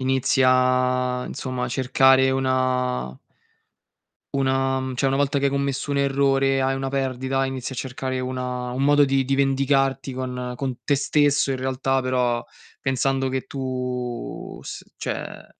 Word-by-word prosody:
inizia, 130 -1 +2
insomma, 130 -2 -4
a - - -3
cercare 130 0 +4
una 130 - 0 1.2
una 135 -1 +1
mhmm, 130 -1 -4
cioè 135 - +1
una 135 - +2
volta 140 0 +1
che 140 - -1
hai 140 - +3
commesso 140 0 -2
un 140 - +1
errore 135 -1 +2
e - - +1
hai 135 0 +1
una 135 0 -2
perdita, 135 0 -1
inizi 130 0 -4
a - - -7
cercare 130 0 -3
una 125 -1 -3
un 130 +2 -2
modo 145 +1 +5
di 135 -1 +1
di 135 +1 0
vendicarti 135 0 +1
con 125 -1 -4
con 130 -2 -3
te 145 - +2
stesso 145 0 +2
in - - -1
realtà, 130 +1 0
però 125 -2 0 0.4
pensando 135 0 0
che 130 0 -2
tu 125 -2 -5
s - - -7
cioè - - -5
130 Hz, 155 wpm, -23 LUFS, 130-135 Hz, 1.2 s, modo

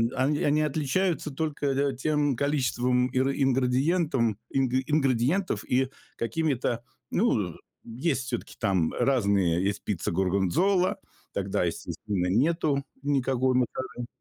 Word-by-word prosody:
они 145 +3 +1
они 150 +1 +3
отличаются 155 +3 0
только, 150 0 -2
э, 140 0 +1
тем 145 0 +1
количеством 125 -3 +1
ингри 135 +2 +1
ингредиентом, 130 - +2
ингри 130 -1 +1
ингредиентов 150 +5 +1
и 130 +1 +2 0.3
какими-то. 120 -1 -1 0.3
Ну, - - +1 0.3
есть 130 +3 -2
всё-таки 125 -3 -5
там 95 -6 +1
разные, 100 -9 +2
есть 100 +1 -1
пицца 95 -5 -2
горгонзола, 95 - +2 0.4
тогда, 95 -2 -1
естественно, 90 +3 -3
нету 140 - +1 0.2
никакой 130 -2 +1
моцареллы. 125 -1 -2
130 Hz, 110 wpm, -27 LUFS, 115-145 Hz, 0.4 s, они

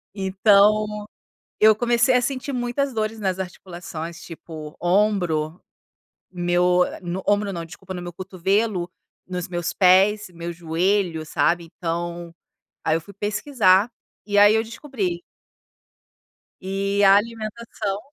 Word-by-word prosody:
Então, 210 +2 +3 0.5
eu 215 0 +7
comecei 240 +2 +2
a 250 - +4
sentir 270 +2 -3
muitas 250 +2 -1
dores 220 0 -2
nas 190 -2 -1
articulações, 170 -2 -7
tipo 160 -3 -9
ombro, 175 -4 +1 0.7
meu, 180 0 +2
ah, - - -7
no 180 +1 -4
ombro 205 0 +2
não, 170 -2 -5
desculpa, 190 +3 -10
no 180 - -6
meu 175 0 -7
cotovelo, 185 +1 -1 0.4
nos 180 -2 -4
meus 175 -1 -2
pés, 195 +3 +4
meu 170 0 -6
joelho, 170 0 0
sabe, 170 +2 +1
então, 170 +1 -5 0.6
aí 160 - +3
eu 165 - -1
fui 200 +5 -14
pesquisar 205 0 +2 0.3
e 205 -1 -1
aí 205 +1 +7
eu 220 - +2
descobri. 225 - -4 1.4
E 200 +1 -1
a 195 0 +8
alimentação 215 -2 -4
190 Hz, 125 wpm, -23 LUFS, 175-215 Hz, 1.4 s, a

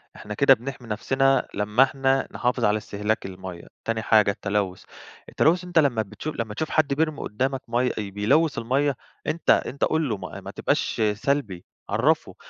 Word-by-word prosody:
إحنا 105 - -7
كده 135 +5 +6
بنحمي 125 0 -6
نفسنا 135 +5 +1
لما 105 +5 +3
إحنا 135 0 +1
نحافظ 125 -1 0
على 105 0 +3
استهلاك 105 +1 -2
المَيَّة، 95 -2 -8 0.2
تاني 115 -1 -1
حاجة 105 -2 +4
التلوث، 100 -2 -2 0.5
التلوث 170 +3 +2
أنتَ 175 -2 +2
لما 135 -7 +2
بتشوف 110 +9 -6
لما 110 -2 -3
تشوف 155 +8 -3
حد 155 -3 +2
بيرمي 155 +1 0
قدامك 130 +5 -2
مَيَّة 120 +1 +1
بيلوث 110 +10 +1
المَيَّة 135 +4 +1 0.3
أنت 155 +2 -2
أنت 140 - +2
قُل 155 -3 +1
له 110 - -1
ما - - -8
ما - - -8
تبقاش - - -1
سلبي 105 -6 -2 0.2
عرفه، - - +1
120 Hz, 165 wpm, -24 LUFS, 105-140 Hz, 0.5 s, كده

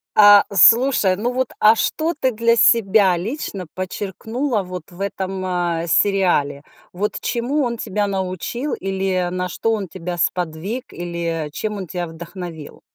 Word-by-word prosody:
А, 205 -1 +8
слушай, 230 -2 +5
ну 235 +6 -2
вот, 255 0 -2
а 215 +1 +7
что 315 +9 -1
ты 260 -4 0
для 230 +1 +2
себя 200 -5 +4
лично 200 - -5
подчеркнула 210 +6 -3
вот 180 -2 -8
в 175 +2 -11
этом, 190 -1 -3
а, 175 -2 -1
сериале? 175 -8 +2 0.3
Вот 200 +4 -2
чему 260 +5 -1
он 235 -2 -2
тебя 210 -1 -2
научил 195 - -3
или 190 -2 -1
на 180 0 -2
что 225 +8 -1
он 205 -4 -2
тебя 180 0 -6
сподвиг, 180 +10 -2
или 170 -3 -3
чем 210 +7 -4
он 190 -3 -6
тя 175 +2 -3
вдохновил? 165 -1 -9
190 Hz, 150 wpm, -20 LUFS, 175-225 Hz, 0.3 s, А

